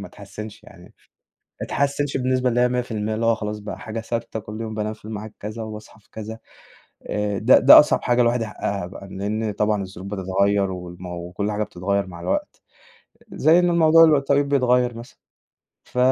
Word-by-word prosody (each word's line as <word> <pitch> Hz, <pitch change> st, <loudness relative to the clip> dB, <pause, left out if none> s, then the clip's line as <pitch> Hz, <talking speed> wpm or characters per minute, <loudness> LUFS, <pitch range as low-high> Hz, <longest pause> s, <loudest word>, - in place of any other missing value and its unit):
ما -, -, -7 dB
اتحسنش 105 Hz, -1 st, -10 dB
يعني، -, -, -15 dB, 0.8 s
ما -, -, -2 dB
اتحسنش 140 Hz, 0 st, -1 dB
بالنسبة 130 Hz, 0 st, +1 dB
اللي 120 Hz, 0 st, 0 dB
هي 125 Hz, -, +5 dB
100%، 110 Hz, -4 st, -2 dB
اللي 115 Hz, -, -1 dB
هو 115 Hz, 0 st, +4 dB
خلاص 105 Hz, -1 st, -5 dB
بقى 105 Hz, 0 st, -7 dB
حاجة 110 Hz, +1 st, -5 dB
ثابتة 115 Hz, 0 st, -4 dB
كل 105 Hz, +1 st, -8 dB
يوم 110 Hz, -1 st, -5 dB
بانام 105 Hz, 0 st, -2 dB
في 110 Hz, -, -18 dB
المعاد 110 Hz, 0 st, -7 dB
كذا 110 Hz, +2 st, -6 dB
وباصحى 110 Hz, 0 st, -10 dB
في 105 Hz, -, -31 dB
كذا، 110 Hz, +1 st, -7 dB, 0.7 s
آآ، 105 Hz, -1 st, -1 dB
ده 120 Hz, +5 st, +6 dB
ده 135 Hz, -, +10 dB
أصعب 150 Hz, -, +3 dB
حاجة 120 Hz, 0 st, +2 dB
الواحد 120 Hz, 0 st, +2 dB
يحققها، 100 Hz, -4 st, -3 dB, 0.2 s
لإن 105 Hz, +3 st, -3 dB
طبعًا 105 Hz, 0 st, 0 dB
الظروف 95 Hz, 0 st, -9 dB
بتتغير 100 Hz, 0 st, 0 dB
والم 90 Hz, 0 st, -8 dB
وكُلّ 90 Hz, +4 st, -4 dB
حاجة 105 Hz, +1 st, -1 dB
بتتغير 100 Hz, 0 st, -2 dB
مع 85 Hz, -2 st, -10 dB
الوقت، 90 Hz, -, -3 dB, 0.7 s
زي 160 Hz, +4 st, +4 dB
ال 180 Hz, -, +3 dB
إن 175 Hz, -, +2 dB
الموضوع 165 Hz, -1 st, +6 dB
اللي 155 Hz, -2 st, +5 dB
التوقيت 140 Hz, +1 st, +1 dB
بيتغير 125 Hz, -3 st, +2 dB
مثلًا، 115 Hz, +1 st, -11 dB, 0.7 s
ف -, -, -12 dB
110 Hz, 185 wpm, -22 LUFS, 100-125 Hz, 0.8 s, ده